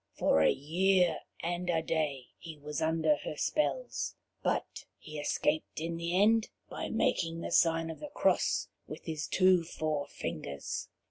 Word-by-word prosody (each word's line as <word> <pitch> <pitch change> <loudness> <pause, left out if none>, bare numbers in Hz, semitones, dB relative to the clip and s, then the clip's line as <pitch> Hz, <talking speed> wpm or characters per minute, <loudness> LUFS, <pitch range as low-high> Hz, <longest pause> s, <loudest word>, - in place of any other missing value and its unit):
For 80 - +4
a 80 - +6
year 180 +3 +2 0.2
and 175 +1 -2
a 165 -2 +2
day 150 -6 -1
he 160 -2 -9
was 150 +2 -5
under 160 -1 +3
her 150 - -6
spells, - - -1 0.3
but - - -2
he 155 -1 -8
escaped 150 +1 0
in 165 +1 -3
the 170 +2 0
end 220 +2 +4 0.2
by - - -4
making 165 0 0
the - - -4
sign 165 -1 +3
of 160 - -9
the 295 - -7
cross 290 - +2 0.2
with - - -8
his 155 -2 -3
two 185 -2 +4
forefingers. 145 - -4
165 Hz, 150 wpm, -31 LUFS, 155-175 Hz, 0.3 s, a